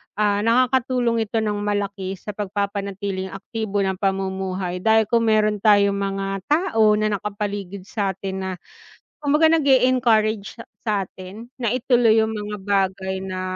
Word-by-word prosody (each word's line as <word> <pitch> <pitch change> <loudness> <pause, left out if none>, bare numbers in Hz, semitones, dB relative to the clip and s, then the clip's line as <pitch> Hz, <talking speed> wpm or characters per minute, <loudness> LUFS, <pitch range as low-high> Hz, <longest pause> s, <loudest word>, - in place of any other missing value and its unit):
Ah, 205 -1 +1
nakakatulong 240 0 +2
ito 220 +1 -1
ng 210 -1 -1
malaki 200 -2 -2
sa 210 - -7
pagpapanatiling 200 -1 -3
aktibo 205 0 -3
ng 190 -1 -2
pamumuhay 190 -2 -2
dahil 220 +3 +4
kung 230 -1 +3
meron 215 -1 +2
tayong 205 -1 +4
mga 195 0 -2
tao 225 - +3
na 215 0 0
nakapaligid 200 -2 -5
sa'tin 195 -1 -3
na 190 0 -3 0.7
kumbaga 300 +2 +3
nag-e-encourage 245 -8 +2
sa 230 - -9 0.2
sa'tin 200 0 -4 0.2
na 235 - +1
ituloy 240 -3 +3
'yung 220 0 +2
mga 210 -1 -5
bagay 190 -1 -1
na, 185 -1 -5
205 Hz, 135 wpm, -22 LUFS, 195-225 Hz, 0.7 s, dahil